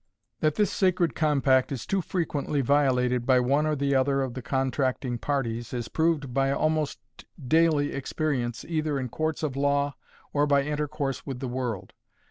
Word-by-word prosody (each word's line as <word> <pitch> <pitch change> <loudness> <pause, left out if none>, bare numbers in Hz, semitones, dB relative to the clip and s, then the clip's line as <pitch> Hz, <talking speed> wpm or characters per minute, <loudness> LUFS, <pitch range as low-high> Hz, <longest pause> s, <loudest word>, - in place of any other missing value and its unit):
That 155 -1 +1
this 210 - +2
sacred 180 - +2
compact 140 -3 +2
is 130 -4 -4
too 195 -1 0
frequently 150 -5 -1
violated 125 -3 +2
by 130 0 +4
one 140 +5 +2
or 155 -1 0 0.2
other 135 +1 +2
of 130 -2 -4
the 130 - -5
contracting 130 -2 -1
parties 120 -5 -2
is 120 -2 -4
proved 160 -6 0
by 135 +1 +2
almost 155 0 0 0.4
daily 155 +1 +2
experience 135 -4 -2
either 155 -3 -1
in 130 -1 -3
courts 155 +4 -2
of 145 -4 -1
law 140 0 +1 0.4
or 145 0 +2
by 140 -1 +3
intercourse 150 -2 -3
with 135 -3 -4
the 130 - -3
world. 120 -6 -4
140 Hz, 160 wpm, -27 LUFS, 130-150 Hz, 0.4 s, by